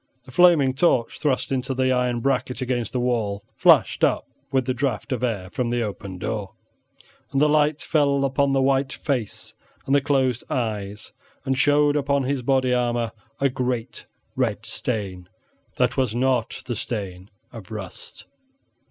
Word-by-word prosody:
The 130 - -12
flaming 155 -3 +5
torch 130 -5 +1
thrust 140 -4 0
into 130 0 -1
the 130 0 +2
iron 125 -1 +1
bracket 130 -1 0
against 125 -2 -2
the 125 - -1
wall 110 -5 -1
flashed - - +4
up - - +2 0.3
with 130 -2 +1
the 130 - 0
draught 125 0 -2
of 125 -2 -1
air 100 -7 -2
from 125 -2 -1
the 120 0 0
open 100 -3 -6
door, 100 +1 -4 0.8
and 135 - +1
the 150 - +5
light 150 0 +2
fell 140 -3 +2
upon 140 +1 +1
the 135 -1 +2
white 135 0 +2
face 125 -10 -3 0.3
and 135 - 0
the 140 - +5
closed 130 -4 +1
eyes, 105 -4 -3 0.3
and 135 -1 +1
showed 145 +2 +3
upon 140 -1 +1
his 135 0 -1
body 130 0 +2
armor 120 -2 0 0.3
a 140 - +3
great 125 -3 -3 0.3
red 115 -4 -1
stain 100 -6 -4 0.5
that 125 +1 +1
was 125 -4 +1
not 125 -2 0
the 120 - -3
stain 95 -5 -5 0.2
of 110 -6 -10
rust. 105 -4 -8
125 Hz, 160 wpm, -23 LUFS, 115-135 Hz, 0.8 s, flaming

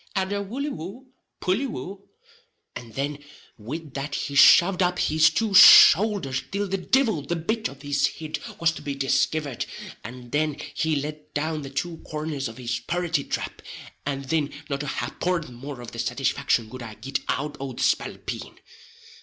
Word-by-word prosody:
and 190 0 0
a 200 - -1
wolly 255 +9 -4
wou, 200 - -8 0.3
pully 200 +10 0
wou," 195 - -7 0.7
and 115 -3 -9
then 145 +1 -3 0.4
wid 145 +7 -7
that 140 +1 -4
he 140 - -3
shoved 180 +6 +7
up 180 0 +2
his 155 +1 +4
two 220 -3 -1
shoulders 185 -8 +8
till 200 +1 -2
the 195 - -1
divil 225 - +2
the 145 +5 -3
bit 220 +7 -1
of 140 +1 -13
his 145 0 +2
hid 155 -1 -6 0.2
was 170 0 +3
to - - -9
be 140 -1 -4
diskivered, 140 0 0 0.4
and 120 +2 -10
then 150 0 0 0.2
he 160 -1 0
let 150 +1 -5
down 155 +1 -1
the 135 - -7
two 165 +5 -3
corners 150 -4 -4
of 115 - -10
his 120 -2 -3
purraty 175 -4 0
trap, - - -4 0.4
and 140 -1 -4
thin 155 -3 +1 0.2
not 140 0 -1
a 145 - -4
haporth 170 0 -2
more 135 +2 -8
of 120 - -9
the 115 - -8
satisfaction 125 0 0
could 130 +3 -9
I 110 -2 -8
git 135 +4 -3
out 150 +1 -1
o' 135 -1 -5
the - - -3
spalpeen. - - -2
150 Hz, 175 wpm, -25 LUFS, 135-180 Hz, 0.7 s, shoulders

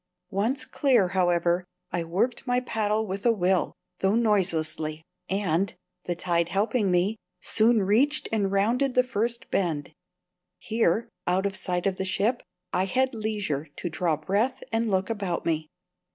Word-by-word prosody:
Once 230 +7 0
clear, 245 -10 +3
however, 175 -1 +2 0.3
I 175 - -1
worked 200 +11 -1
my 245 0 +3
paddle 220 -3 0
with 195 0 -4
a 235 - +5
will, 185 -5 +1 0.2
though 195 +2 +2
noiselessly; 160 -8 0 0.3
and, 190 -2 0 0.3
the 175 - -1
tide 170 -1 0
helping 210 +1 +1
me, 180 +5 +2 0.2
soon 220 -1 +3
reached 255 +10 +2
and 205 -3 +1
rounded 240 +7 +1
the 255 - +5
first 235 +1 -2
bend. 160 -5 -1 0.6
Here, 225 0 +1 0.2
out 185 +2 +2
of 195 -1 -1
sight 180 -2 -1
of 195 -1 0
the 190 - -2
ship, 215 +6 +1 0.3
I 185 +1 +2
had 260 +6 +1
leisure 205 -10 -2
to 175 - -4
draw 165 -2 0
breath 205 - 0
and 225 0 +1
look 190 +2 0
about 195 -6 -2
me. 160 -2 0
195 Hz, 150 wpm, -26 LUFS, 175-230 Hz, 0.6 s, a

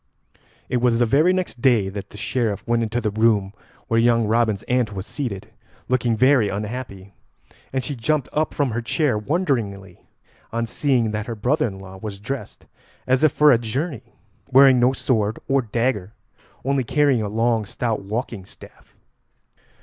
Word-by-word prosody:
It 125 - 0
was 120 -1 +2
the 120 - +3
very 150 +9 +4
next 185 -9 -3
day 115 -7 +3
that 100 0 -6
the - - -12
Sheriff 110 -1 -2
went 120 0 +2
into 115 +1 -1
the 110 -3 -1
room 105 -2 +2 0.3
where 115 - +2
young 115 -1 +3
Robin's 110 -2 +1
aunt 125 -4 0
was 95 -1 -5
seated, 115 -10 -5 0.4
looking 120 -3 +1
very 130 -3 +4
unhappy, 100 -2 -6 0.6
and 130 -1 -1
she 145 - -4
jumped 140 +3 0
up 155 0 0
from 140 -4 -1
her 120 +2 -2
chair 130 +2 0
wonderingly 105 - -2 0.5
on 115 0 -1
seeing 120 -2 0
that 105 0 -4
her 115 - -4
brother 130 +8 +1
in 95 -3 -7
law 95 0 -11
was 105 0 -6
dressed 135 +6 -6 0.4
as 130 +3 +2
if 155 - +5
for 150 +2 +5
a 120 - +4
journey, 130 +4 -4 0.3
wearing 135 -1 +6
no 125 +1 +4
sword 110 -5 0
or 135 0 +2
dagger, 115 -3 -2 0.5
only 135 -1 +1
carrying 140 -1 +2
a 105 - -2
long 115 +1 +1
stout 110 +2 -3
walking 105 0 -4
staff. - - -17
115 Hz, 170 wpm, -22 LUFS, 105-130 Hz, 0.6 s, wearing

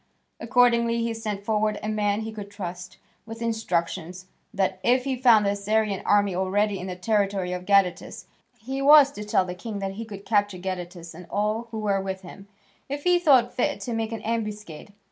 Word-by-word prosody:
Accordingly 235 -1 +3
he 230 0 -1
sent 210 -3 -5
forward 215 -1 0
a - - -3
man 210 -1 0
he 220 0 -5
could 205 -2 -8
trust, 180 -3 -7 0.3
with 225 0 -8
instructions 185 -5 -2 0.3
that, 190 -1 -1
if 250 +3 +3
he 270 -1 -1
found 235 -4 +5
the 200 - +2
Assyrian 205 0 0
army 205 -2 +3
already 195 +2 0
in 180 - -6
the 180 - -5
territory 195 -2 0
of 180 0 -6
Gadatas, 195 -3 +1 0.3
he 265 +5 -5
was 285 0 +7
to 210 - -7
tell 210 -3 +1
the 180 - -5
king 210 +3 -6
that 195 -1 -3
he 220 +4 -7
could 200 -2 -10
capture 205 -3 +1
Gadatas 180 -2 -6
and 175 +1 -12
all 215 +3 -1
who 225 - -6
were 200 -2 0
with 190 0 -5
him, 195 +2 -12 0.4
if 285 +1 -4
he 355 0 +4
thought 260 -8 +4
fit 290 +4 -1
to 240 - -4
make 225 0 -2
an 225 -2 -6
ambuscade. 210 -6 -4
210 Hz, 195 wpm, -25 LUFS, 190-230 Hz, 0.4 s, was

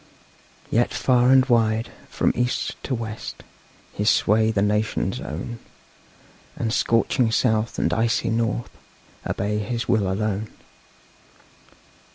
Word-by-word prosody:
Yet 120 +2 +2
far 125 -1 +3
and 130 -1 +6
wide, 115 -2 +1 0.2
from - - +1
East 125 +1 -1
to 130 - -1
West, 110 -1 -6 0.5
His 105 +1 +1
sway 110 +2 +3
the 105 -3 +1
nations 105 +1 0
own; 105 +10 -6 1.0
And 115 -1 -2
scorching 115 +1 +2
South 110 -2 +1
and - - +1
icy 115 0 +1
North 115 +1 -1 0.6
Obey 105 +1 -1
his 115 +3 -3
will 105 -5 +2
alone. 105 +1 -2
110 Hz, 115 wpm, -23 LUFS, 105-120 Hz, 1.0 s, and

